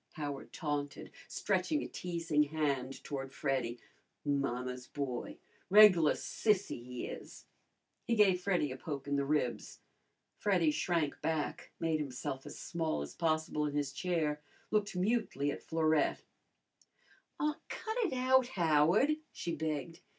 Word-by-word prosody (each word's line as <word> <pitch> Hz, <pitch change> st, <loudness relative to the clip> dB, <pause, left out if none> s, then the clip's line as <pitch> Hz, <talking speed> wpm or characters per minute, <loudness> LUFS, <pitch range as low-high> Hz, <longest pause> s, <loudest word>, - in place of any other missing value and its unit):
Howard 145 Hz, -3 st, -5 dB
taunted, 145 Hz, -3 st, -3 dB, 0.2 s
stretching 305 Hz, -1 st, 0 dB
a -, -, -4 dB
teasing 165 Hz, -4 st, 0 dB
hand 140 Hz, -3 st, -1 dB
toward 135 Hz, -2 st, -4 dB
Freddy. 130 Hz, -4 st, -1 dB, 0.5 s
"Mamma's 125 Hz, -3 st, -1 dB
boy! 135 Hz, -4 st, -4 dB, 0.3 s
Reg'lar 190 Hz, -6 st, +8 dB
sissy, 205 Hz, -, 0 dB
he 125 Hz, 0 st, -5 dB
is!" -, -, -8 dB, 0.6 s
He 235 Hz, -, +2 dB
gave 195 Hz, -4 st, +5 dB
Freddy 180 Hz, -7 st, +1 dB
a 130 Hz, -, -5 dB
poke 140 Hz, 0 st, -5 dB
in 145 Hz, -, +1 dB
the 140 Hz, -, +1 dB
ribs. 140 Hz, -4 st, -1 dB, 0.6 s
Freddy 180 Hz, -6 st, +3 dB
shrank 160 Hz, -2 st, 0 dB
back, 160 Hz, -2 st, -2 dB
made 160 Hz, -1 st, +1 dB
himself 135 Hz, -1 st, -4 dB
as -, -, -8 dB
small 160 Hz, -, -2 dB
as 70 Hz, -, -8 dB
possible 155 Hz, -2 st, 0 dB
in 145 Hz, -, -4 dB
his 145 Hz, -2 st, -1 dB
chair, 155 Hz, -2 st, 0 dB, 0.3 s
looked 210 Hz, -2 st, +1 dB
mutely 180 Hz, -, +1 dB
at -, -, -6 dB
Florette. 160 Hz, -1 st, +1 dB, 1.2 s
"Aw, 300 Hz, +1 st, 0 dB
cut 440 Hz, +1 st, -4 dB
it 430 Hz, -, +1 dB
out, 260 Hz, 0 st, +4 dB
Howard," 175 Hz, -, +3 dB
she 170 Hz, -1 st, -3 dB
begged. 155 Hz, +1 st, -3 dB
155 Hz, 135 wpm, -33 LUFS, 140-180 Hz, 1.2 s, Reg'lar